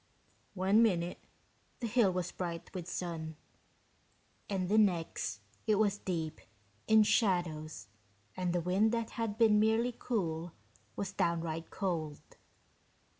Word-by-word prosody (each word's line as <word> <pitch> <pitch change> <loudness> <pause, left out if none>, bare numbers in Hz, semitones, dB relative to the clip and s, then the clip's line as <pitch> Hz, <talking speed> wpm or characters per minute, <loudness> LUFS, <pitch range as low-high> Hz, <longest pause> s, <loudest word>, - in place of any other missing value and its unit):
One 195 +4 +4
minute 180 -6 +1 0.6
the 240 - -3
hill 230 -3 +3
was 180 -1 -2
bright 170 -2 -5
with 180 -3 -5
sun, 165 -3 -4 1.1
and 190 -3 -1
the 215 +3 +4
next 165 - 0 0.3
it 215 - +4
was 205 -1 +2
deep 160 -4 -3 0.5
in 220 0 +7
shadows 175 -8 +1 0.5
and 180 -1 -1
the 175 0 +1
wind 190 +6 +2
that 230 -1 -1
had 225 -3 -3
been 220 -2 +5
merely 225 +3 +2
cool 170 -7 -2 0.4
was 200 - -4
downright 165 -1 -1
cold. 160 -6 -2
185 Hz, 125 wpm, -33 LUFS, 170-215 Hz, 1.1 s, in